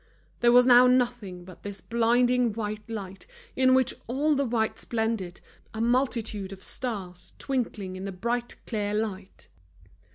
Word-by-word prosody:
There 240 Hz, 0 st, +5 dB
was 245 Hz, +1 st, +7 dB
now 250 Hz, 0 st, +8 dB
nothing 240 Hz, -8 st, 0 dB
but 185 Hz, -2 st, -13 dB
this 200 Hz, -1 st, -7 dB
blinding 240 Hz, 0 st, +2 dB
white 210 Hz, 0 st, -5 dB
light 195 Hz, -4 st, -7 dB, 0.3 s
in 260 Hz, 0 st, +4 dB
which 260 Hz, -1 st, +3 dB
all 285 Hz, +6 st, +1 dB
the 280 Hz, -2 st, +1 dB
whites 225 Hz, -2 st, -1 dB
blended, 220 Hz, -6 st, -2 dB, 0.3 s
a -, -, -4 dB
multitude 230 Hz, -5 st, 0 dB
of 195 Hz, -1 st, -10 dB
stars 190 Hz, -8 st, -4 dB
twinkling 220 Hz, -8 st, -3 dB
in 185 Hz, +1 st, -6 dB
the 195 Hz, -, -4 dB
bright 235 Hz, +6 st, -3 dB
clear 210 Hz, -2 st, -2 dB
light. 200 Hz, -3 st, -4 dB
225 Hz, 150 wpm, -27 LUFS, 200-245 Hz, 0.3 s, now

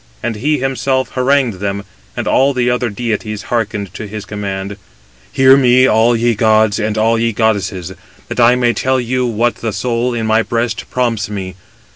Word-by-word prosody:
And 115 Hz, -, -2 dB
he 150 Hz, +7 st, 0 dB
himself 130 Hz, 0 st, -1 dB
harangued 130 Hz, -5 st, +1 dB
them, 100 Hz, 0 st, -3 dB, 0.3 s
and -, -, -3 dB
all 135 Hz, +1 st, +2 dB
the 125 Hz, -1 st, +1 dB
other 125 Hz, -1 st, -1 dB
deities 105 Hz, -1 st, -3 dB
hearkened 105 Hz, -4 st, -2 dB
(to 105 Hz, -, -7 dB
his 105 Hz, 0 st, -7 dB
command): 100 Hz, -1 st, -5 dB, 0.6 s
266 -, -, -13 dB
"Hear 130 Hz, 0 st, +7 dB
me, 130 Hz, -1 st, +4 dB
all 115 Hz, +1 st, +3 dB
ye 120 Hz, +1 st, +1 dB
gods 110 Hz, -1 st, +2 dB
and 110 Hz, 0 st, -2 dB
all 115 Hz, +1 st, +2 dB
ye 115 Hz, 0 st, +1 dB
goddesses, 100 Hz, -5 st, -1 dB, 0.3 s
that -, -, -5 dB
I 120 Hz, +1 st, +5 dB
may 120 Hz, -1 st, +2 dB
tell 130 Hz, +4 st, 0 dB
you 125 Hz, +1 st, -1 dB
what 120 Hz, +1 st, 0 dB
the 115 Hz, -, -3 dB
soul 120 Hz, +3 st, -1 dB
in 115 Hz, -1 st, -2 dB
my 110 Hz, +1 st, +3 dB
breast 115 Hz, 0 st, -3 dB
prompts 120 Hz, -5 st, -1 dB
me. 95 Hz, -3 st, -5 dB
115 Hz, 185 wpm, -15 LUFS, 105-125 Hz, 0.6 s, Hear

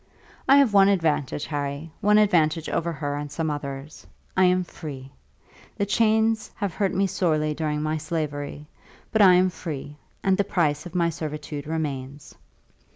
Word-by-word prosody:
"I 275 Hz, -, +8 dB
have 275 Hz, -7 st, +4 dB
one 195 Hz, -1 st, +7 dB
advantage, 155 Hz, -7 st, 0 dB
Harry, 145 Hz, +1 st, -4 dB
one 210 Hz, +1 st, +4 dB
advantage 165 Hz, -6 st, +3 dB
over 170 Hz, +1 st, -1 dB
her 145 Hz, -2 st, -3 dB
and 145 Hz, 0 st, -5 dB
some 155 Hz, +1 st, -2 dB
others. 140 Hz, 0 st, -7 dB, 0.3 s
I 190 Hz, -, +5 dB
am 180 Hz, 0 st, +3 dB
free. 140 Hz, -6 st, -9 dB, 0.7 s
The 200 Hz, -, +1 dB
chains 220 Hz, +1 st, +2 dB
have 200 Hz, -4 st, -3 dB
hurt 200 Hz, -3 st, 0 dB
me 195 Hz, +1 st, +1 dB
sorely 155 Hz, -5 st, 0 dB
during 150 Hz, -1 st, -2 dB
my 155 Hz, +1 st, -1 dB
slavery; 150 Hz, -2 st, -4 dB, 0.5 s
but 220 Hz, -, +3 dB
I 185 Hz, -3 st, +8 dB
am 185 Hz, +1 st, +3 dB
free, 150 Hz, -4 st, -7 dB, 0.3 s
and 190 Hz, -1 st, +3 dB
the -, -, +4 dB
price 155 Hz, -5 st, 0 dB
of 175 Hz, -, -13 dB
my 170 Hz, -1 st, +2 dB
servitude 150 Hz, -2 st, -6 dB
remains. 145 Hz, -3 st, -4 dB
160 Hz, 160 wpm, -25 LUFS, 145-185 Hz, 0.7 s, I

